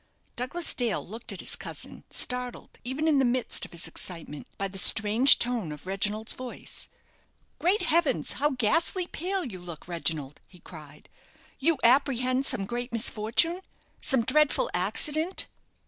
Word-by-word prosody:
Douglas 270 +8 -1
Dale 240 -4 -2
looked 225 +5 -7
at - - -2
his - - -2
cousin, - - -5
startled, 250 -1 -3
even 265 +6 -2
in 295 -3 +3
the - - +3
midst 245 0 +1
of - - -14
his 170 - -3
excitement, 165 -5 -6
by 195 - -2
the 195 0 -3
strange 220 +7 +6
tone 235 -9 -1
of 150 +1 -10
Reginald's 210 +3 -1
voice. 255 -1 -5 0.7
"Great 365 +3 +2
heavens! 320 -5 +2
how 295 +3 +1
ghastly 305 - +1
pale 370 +2 -3
you 195 -8 -7
look, 175 -3 -10
Reginald!" 160 -5 -2
he 180 - -18
cried; 155 -4 -13 0.5
"you 315 +3 +2
apprehend 255 +1 +3
some 195 - +1
great 240 +3 -4
misfortune 235 - +1 0.4
some 265 -4 +4
dreadful 300 +4 +2
accident?" 295 - +1
245 Hz, 145 wpm, -27 LUFS, 195-290 Hz, 0.7 s, strange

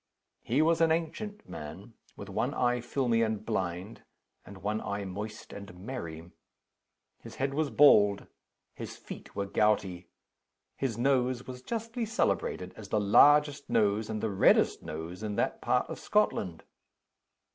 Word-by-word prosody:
He 135 +7 +2
was 165 0 +2
an 165 -1 +4
ancient 205 +6 -3
man 95 +10 -9 0.2
with 100 - -9
one 110 +8 -2
eye 125 0 +1
filmy 120 -2 0
and 110 -2 -1
blind, 95 -1 -3 0.4
and 95 -1 -13
one 105 +1 -1
eye 100 0 -3
moist 105 +3 -7
and 100 -2 -10
merry. 90 -6 -7 0.9
His - - -11
head 135 +1 -1
was 150 0 0
bald; 105 -10 +5 0.5
his - - -8
feet - - -10
were 100 0 -1
gouty; 100 -4 +1 0.7
his 125 -5 -2
nose 125 -1 +1
was 125 -1 -8
justly 230 - -3
celebrated 95 - -1
as 105 -2 -10
the 105 - +1
largest 145 +8 +5
nose 105 0 +2
and 110 -1 -3
the 110 - 0
reddest 95 - +4
nose 80 +4 -7
in 105 -1 -3
that - - -1
part - - +1
of - - -7
Scotland. 85 -3 0
110 Hz, 145 wpm, -30 LUFS, 100-135 Hz, 0.9 s, bald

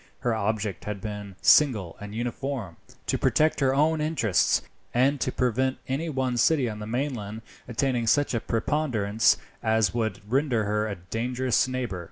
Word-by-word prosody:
Her 120 -3 +1
object 110 -3 -2
had 105 -1 -4
been 105 -1 -6
single 110 - +4
and 105 +1 -7
uniform, 120 -5 -4 0.3
to - - 0
protect 155 +1 +2
her 135 -2 +2
own 155 +2 +2
interests, 130 - +2 0.3
and 135 +3 +3
to - - 0
prevent 130 +2 0
any 145 +6 -2
one 130 -4 -1
city 135 +2 +3
on 105 -2 -5
the 105 - -6
mainland 115 -4 -3 0.2
attaining 120 -1 0
such 145 +5 +3
a 115 - +1
preponderance 115 -4 +1 0.2
as 110 -3 +2
would 110 -5 -2
render 130 -2 +1
her 105 +1 0
a 100 - -3
dangerous 120 +8 0
neighbour. 125 -7 -3
120 Hz, 160 wpm, -26 LUFS, 105-135 Hz, 0.3 s, single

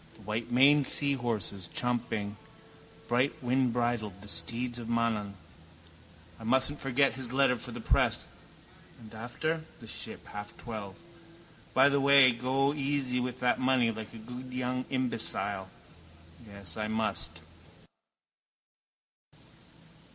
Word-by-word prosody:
The - - -15
whitemaned 120 +7 +3
seahorses, 115 - 0
champing, 115 -4 -1 0.7
brightwindbridled, 120 -4 0
the - - -10
steeds 115 +8 -1
of 115 - -7
Mananaan. 115 -4 0 1.0
I - - -10
mustn't 130 +5 +2
forget 135 +1 +2
his 130 -2 -5
letter 135 -1 +3
for 115 - -7
the - - -6
press. - - +2 0.7
And 110 -1 -13
after? 155 +8 -3 0.2
The 115 - -11
Ship, - - -5
half 105 0 -8
twelve. 105 -5 -7 0.8
By 130 +1 +7
the 140 0 +2
way 140 -2 +7
go 130 +4 +1
easy 135 -3 0
with 125 0 -3
that 125 -1 +2
money 130 -3 +3
like 110 -1 -7
a - - -7
good 125 +3 -8
young 125 0 -2
imbecile. 105 -7 0 0.8
Yes, 100 -4 -8
I 105 0 -1
must. 85 -8 -1
120 Hz, 115 wpm, -30 LUFS, 110-130 Hz, 1.0 s, By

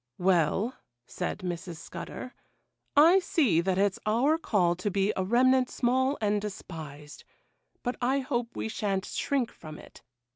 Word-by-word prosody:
'Well,' 185 - +2 0.3
said 180 +8 -4
Mrs. 175 -1 -5
Scudder, 250 +8 -8 0.6
'I 335 +6 +8
see 270 - +2
that 185 +1 0
it's 200 -1 +1
our 265 +9 +3
call 180 - +2
to 185 +3 -2
be 200 +2 +1
a 190 - 0
remnant 250 +5 +3
small 260 +3 +1
and 210 -1 +1
despised, 155 -7 -8 0.6
but 245 0 -2
I 260 +3 +2
hope 245 -2 -3
we - - -3
sha'n't 200 -3 -2
shrink 265 -5 -1
from 155 -2 -10
it. - - -14
210 Hz, 145 wpm, -28 LUFS, 180-255 Hz, 0.6 s, I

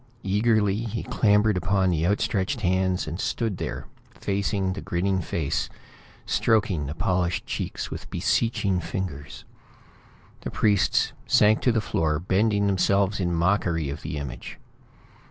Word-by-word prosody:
Eagerly, 105 0 +2
he 115 0 -3
clambered 105 -3 +3
upon 95 +1 +1
the 85 0 +1
outstretched 100 +4 0
hands, 95 -1 +1
and 80 +4 -5
stood 110 -6 -1
there - - -4 0.3
facing 100 -1 -1
the 100 - -6
grinning 95 +2 0
face, 80 -3 -2 0.6
stroking 95 -9 +1
the 75 - -5
polished 90 +1 0
cheeks - - -4
with - - -7
beseeching 100 0 +1
fingers. 75 -7 -5 0.9
The - - -5
priests 100 -3 +2
sank 105 +1 +4
to 125 - +3
the 115 -1 +1
floor, 80 -6 0
bending 100 +5 +1
themselves 100 +1 +2
in 90 -2 0
mockery 85 -4 +1
of - - -6
the - - -5
image. 70 -3 -7
95 Hz, 135 wpm, -25 LUFS, 85-105 Hz, 0.9 s, sank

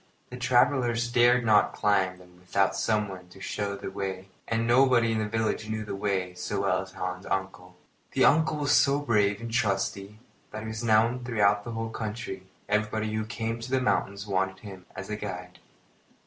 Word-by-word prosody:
The 125 - -6
travellers 125 -1 +2
dared 120 0 +4
not 105 -2 +4
climb 95 -3 +1
them 90 -1 -18
without 95 +2 +1
someone 100 -4 -1
to 95 - -15
show 100 +1 -3
the 100 - -6
way, 95 -1 -5 0.2
and 115 0 0
nobody 120 -1 +4
in 110 - 0
the 110 - -1
village 110 -1 -1
knew 110 0 -3
the 100 - -4
way 95 -3 -1
so 100 +2 -3
well 95 -1 +1
as 95 0 -11
Hans's 90 0 -5
uncle. 95 -1 -3 0.4
The - - +4
uncle 155 0 +4
was 145 -1 0
so 140 -1 +5
brave 105 -7 +2
and 115 0 -6
trusty 100 -2 -1 0.3
that 110 +1 -7
he 110 - -5
was 110 +1 -5
known 115 +2 +3
throughout 105 -4 +2
the 120 - -6
whole 115 0 -3
country, 110 -4 -5 0.2
and 105 +1 +3
everybody 110 0 -3
who 110 0 -1
came 115 0 -3
to 115 - -7
the 130 0 +2
mountains 100 -5 0
wanted 95 -1 -1
him 95 -3 -11
as 95 0 -6
guide. 90 -4 -6
105 Hz, 190 wpm, -27 LUFS, 95-115 Hz, 0.4 s, so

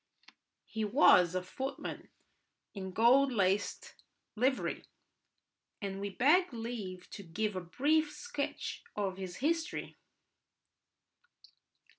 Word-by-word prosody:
He 220 0 -4
was 200 - +5
a 185 - 0
footman 265 +9 -5 0.6
in 190 -2 -6
gold 250 +7 +5
laced 200 -2 0 0.4
livery, 255 +4 0 1.0
and 195 -2 -4
we 200 - -2
beg 300 - +4
leave 225 -6 -6
to - - -7
give 205 +3 -2
a 185 - -2
brief 295 - +1
sketch 475 +10 -4
of 195 -2 -2
his 185 -2 -6
history. 325 - -2
215 Hz, 100 wpm, -33 LUFS, 190-275 Hz, 1.0 s, was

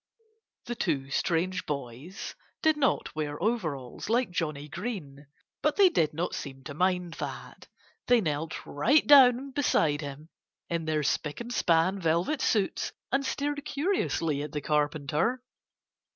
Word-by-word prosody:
The 240 - -3
two 145 - -1
strange 180 +5 0
boys 140 - -5 0.3
did 315 -1 +4
not 275 -5 0
wear 150 -1 -3
overalls, 165 - -2
like 240 -2 +2
Johnnie 150 -4 -3
Green. 150 - -6 0.3
But 300 - +2
they 395 -2 +7
did 160 - +1
not 165 +4 -3
seem 135 -2 -6
to 145 - -7
mind 180 +1 0
that. - - -7 0.4
They 245 -1 +6
knelt 155 -4 -3
right 255 - +3
down 270 -1 +7
beside 165 - +2
him 145 +2 -8 0.4
in 165 -1 -1
their 155 -1 0
spick 150 +1 -1
and 240 +1 -5
span 175 0 +2
velvet 175 - +1
suits 205 -4 0 0.2
and 270 +2 +2
stared 285 +1 -2
curiously 285 - 0
at 150 0 -6
the 150 - -2
Carpenter. 150 - 0
170 Hz, 140 wpm, -28 LUFS, 150-245 Hz, 0.4 s, they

